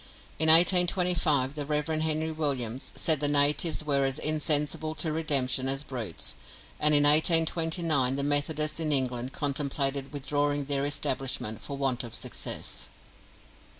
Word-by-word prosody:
In 160 0 +3
1825 170 -5 +4
the 150 -1 -4
Rev. 150 +1 -2
Henry 160 0 -1
Williams 135 -6 -3
said 160 -3 +2
the 145 - +1
natives 145 +3 +2
were 140 -2 0
as 135 0 -1
insensible 155 0 -1
to 160 +1 -2
redemption 135 -4 0
as 135 +1 -1
brutes, 115 - -4 0.4
and 150 0 +4
in 145 - +4
1829 160 -2 +2
the 140 - -2
Methodists 150 +2 0
in 155 -2 -1
England 130 -2 0
contemplated 140 -1 -2
withdrawing 145 0 -2
their 140 0 -2
establishment 130 -5 -2
for 140 - -6
want 135 -3 -1
of 120 - -7
success. - - -5
145 Hz, 135 wpm, -27 LUFS, 135-155 Hz, 0.4 s, 1825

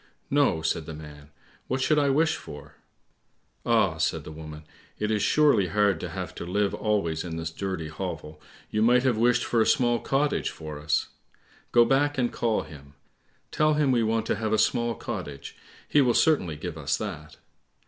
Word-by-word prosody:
"No," 135 - +2
said 80 -1 -1
the 80 - -6
man; 75 -1 -12 0.4
"what 130 - -1
should 150 +3 +3
I 145 -1 +2
wish 155 +4 +2
for?" 75 -1 -10 0.9
"Ah," - - +3
said - - -1
the - - -9
woman, 75 0 -9 0.3
"it 105 0 -1
is 105 -1 +1
surely 145 -10 +3
hard 100 -1 +2
to - - -5
have - - -6
to - - -2
live 100 +3 0
always 100 -7 -1
in 85 -2 -5
this 80 0 -4
dirty 95 -3 -4
hovel; 80 -2 -6 0.3
you 105 - 0
might 125 +2 +4
have 130 -3 +2
wished 120 +2 +2
for 115 - +2
a - - +3
small 120 -4 +3
cottage 140 +2 0
for 75 -2 -8
us. 75 0 0 0.6
Go 120 -1 +6
back 145 +3 +2
and 125 -2 0
call 115 -2 0
him. 70 -2 -14 0.6
Tell 155 0 +2
him 150 -3 +2
we 120 -2 +3
want 110 0 0
to - - 0
have 110 0 -1
a - - +3
small 120 0 +1
cottage, 90 -12 -6 0.3
he 145 - +4
will 125 -3 +2
certainly 95 - +2
give 80 +1 -6
us 70 - 0
that." - - -7
105 Hz, 190 wpm, -26 LUFS, 80-125 Hz, 0.9 s, Go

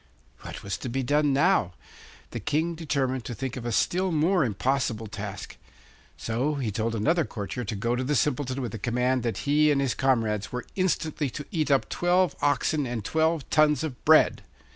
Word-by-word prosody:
What - - -9
was 100 - -4
to 125 - -5
be 130 +3 -2
done 145 +3 +2
now? 140 - +2 0.6
The - - -4
King 160 +3 0
determined 135 -6 -1
to 120 - -5
think 130 0 -4
of 120 -2 -5
a - - -1
still 185 +10 +1
more 165 +3 +2
impossible 120 0 -1
task. 100 -2 -7 0.6
So 125 +7 -1
he 125 -6 -2
told 115 +2 -2
another 160 +10 +2
courtier 105 0 -5
to 105 - -4
go 115 +4 -1
to 125 - -2
the 145 +3 0
Simpleton 135 -1 0
with 120 - -4
the 115 - -6
command 125 +3 0
that 115 -1 -3
he 150 +1 +4
and 145 -2 +2
his 135 -3 +1
comrades 115 -6 0
were 125 -1 -4
instantly 160 -5 0
to 145 +4 -7
eat 155 -4 -1
up 135 -2 +3
twelve 180 +1 +1
oxen 145 0 +1
and 120 -4 -4
twelve 160 0 +1
tons 150 -2 +4
of 145 -6 -6
bread. - - +5
135 Hz, 190 wpm, -26 LUFS, 115-150 Hz, 0.6 s, bread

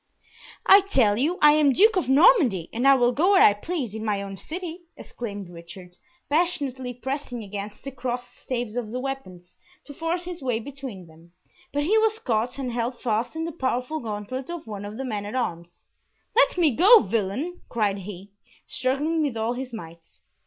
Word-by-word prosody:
"I 395 +1 +8
tell 260 - +2
you 325 +7 +1
I 300 - +9
am 295 -2 +4
Duke 430 - +5
of 360 -8 0
Normandy, 270 - +5
and 240 +4 +1
I 275 - +8
will 245 -2 +3
go 345 +10 +3
where 385 - +7
I 205 - +7
please 255 - -4
in 220 0 -5
my 205 -2 -1
own 195 0 -7
city!" 340 - -7 0.2
exclaimed 205 -5 -7
Richard, 175 +1 -12 0.3
passionately 285 -6 -1
pressing 250 -1 -5
against 205 +1 -7
the 275 - -6
crossed 245 -1 -5
staves 240 -3 -4
of 240 -3 -3
the 250 +3 -4
weapons, 185 -10 -7 0.3
to 285 - -10
force 330 +4 -2
his 355 -2 -7
way 250 -4 -1
between 260 -7 -8
them, 165 +1 -19 0.4
but 290 +1 0
he 425 +8 +3
was 440 0 +2
caught 240 - -1
and 260 -3 -3
held 240 +1 -3
fast 230 +3 -1
in 325 0 -2
the 335 - -4
powerful 260 0 -2
gauntlet 225 +4 -5
of 345 -2 -6
one 205 -2 -7
of 210 +2 -7
the 270 - -4
men 210 -5 -3
at 205 +4 -6
arms. 175 -8 -4 0.5
"Let - - +4
me 315 -8 +3
go, 410 +8 +8
villain!" 225 - -2
cried 205 -4 0
he, 195 0 -9 0.3
struggling 295 +5 -1
with 280 -6 -1
all 225 +2 0
his 255 +1 -6
might. 170 -7 -9
250 Hz, 190 wpm, -25 LUFS, 210-305 Hz, 0.5 s, I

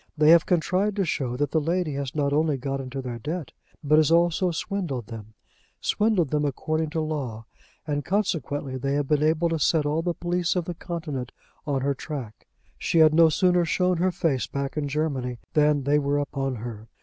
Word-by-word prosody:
They 155 +1 +6
have 170 -1 +6
contrived 185 +4 +1
to 195 -2 +1
show 125 -6 -2
that 145 0 -1
the 160 - +2
lady 165 0 -1
has 140 -1 -4
not 140 -1 +1
only 150 -1 +2
got 135 +1 -3
into 130 +1 -6
their 120 -2 -5
debt, 155 +5 -4 0.3
but 150 +1 +4
has 155 - +3
also 170 +2 +3
swindled 170 - -3
them, 110 -1 -10 0.4
swindled 210 -9 +1
them 150 -1 +1
according 155 +3 -1
to 160 +1 -2
law, 135 -8 -4 0.4
and 145 -1 -2
consequently 145 - -1
they 140 +2 -1
have 145 -1 0
been 150 0 +2
able 160 +2 +2
to 165 -1 -1
set 150 +1 +2
all 150 +2 0
the 175 0 -2
police 175 0 -1
of 180 -2 0
the 175 - -4
continent 160 -8 -5 0.4
on 140 -2 0
her 140 +1 +1
track. 130 -7 -7 0.3
She - - 0
had 155 -1 +6
no 165 0 +6
sooner 180 +2 +3
shown 180 +2 +1
her 180 +3 +2
face 145 -7 0
back 140 0 -4
in 150 -2 -1
Germany, 140 -4 -2 0.2
than 150 -2 +3
they 145 +2 +3
were 140 0 0
upon 135 -2 -2
her. 110 -1 -7
150 Hz, 200 wpm, -25 LUFS, 135-170 Hz, 0.4 s, They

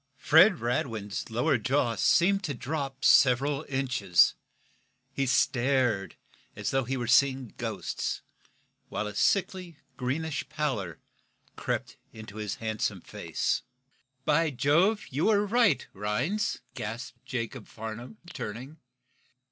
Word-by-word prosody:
Fred 170 +9 +6
Radwin's 115 - -2
lower 120 +4 +1
jaw 125 0 +1
seemed 190 - +3
to 145 -4 -3
drop 135 0 -4
several 140 +3 +4
inches. 125 -10 +3 0.8
He 135 0 -1
stared 125 -6 +1 0.4
as - - -3
though 135 -1 +1
he 135 +2 -2
were 120 - -2
seeing 130 0 +3
ghosts, - - -3 0.7
while - - -2
a 105 - -5
sickly, 180 - 0 0.2
greenish 145 +5 -2
pallor 130 - -2 0.6
crept - - -3
into 110 -1 -10
his 105 -2 -3
handsome 110 -1 -2
face. - - -2 0.6
"By 160 +2 +3
Jove, 165 - +2
you 140 +5 0
were 210 -1 +3
right, 210 - +3
Rhinds!" 140 - -1
gasped 120 +3 -6
Jacob 120 -3 -5
Farnum, 115 - -8 0.2
turning. 125 +9 -6
130 Hz, 115 wpm, -28 LUFS, 115-155 Hz, 0.8 s, Fred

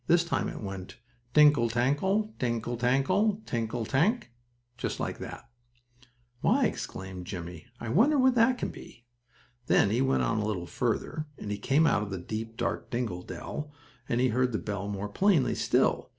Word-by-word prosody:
This 170 0 +5
time 170 - -1
it - - -7
went: 95 0 -7 0.4
"Tinkle 145 -6 +6
tankle! 145 - +1
Tinkle 120 -1 -1
tankle! 185 - +2
Tinkle 115 0 -2
tank 165 - +1 0.2
" 120 0 -43
just - - -3
like - - -3
that. - - -8 0.9
"Why!" - - +3
exclaimed 95 -1 -5
Jimmie. 90 -1 -7
"I 115 - -5
wonder 255 - +4
what 260 -1 +5
that 245 +1 +4
can - - -2
be?" 120 - -13 0.6
Then 100 - +4
he 120 +4 +2
went 135 0 +2
on 115 -1 +1
a 105 - -1
little 95 -5 -2
farther, 155 - -2
and 105 - -6
he 105 - -3
came 140 +9 +3
out 105 - +3
of 105 - -4
the 95 - -3
deep, 110 +5 -5
dark - - -2
dingle 115 -7 -2
dell, 145 - -6 0.4
and 120 - +1
he 130 0 +3
heard 125 +1 +1
the - - +1
bell 100 -2 -4
more 100 0 -3
plainly 165 - +3
still. - - +1
120 Hz, 180 wpm, -29 LUFS, 105-155 Hz, 0.9 s, Tinkle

